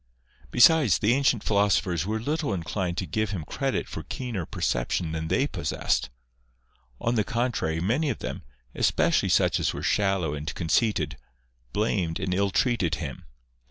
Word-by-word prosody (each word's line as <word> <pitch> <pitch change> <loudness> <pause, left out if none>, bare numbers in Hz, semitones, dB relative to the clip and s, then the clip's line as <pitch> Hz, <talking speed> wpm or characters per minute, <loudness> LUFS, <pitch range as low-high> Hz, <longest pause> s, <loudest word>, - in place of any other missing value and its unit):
Besides, 140 - +6
the 105 +3 +2
ancient 130 -5 +2
philosophers 100 -4 +1
were 110 +1 -1
little 145 -2 -1
inclined 90 +1 -3
to 95 - -1
give 110 +6 -1
him 95 -6 -4
credit - - -2
for - - -6
keener 115 -10 -5
perception 70 +6 -1
than 80 0 -3
they 130 +11 +2
pos 80 - -3
sessed; 60 - 0 0.9
on 115 - 0
the 110 -3 +2
contrary, 115 -9 -1
many 125 - +1
of 120 - -2
them, - - -5 0.3
especially - - +2
such - - +3
as - - 0
were - - -5
shallow 95 -6 +1
and 75 +1 -4
conceited, 80 - +1 0.5
blamed 95 -5 0
and 95 -1 -1
ill 100 +2 +1
treated 95 - +1
him. 75 -5 -6
100 Hz, 160 wpm, -26 LUFS, 80-115 Hz, 0.9 s, Besides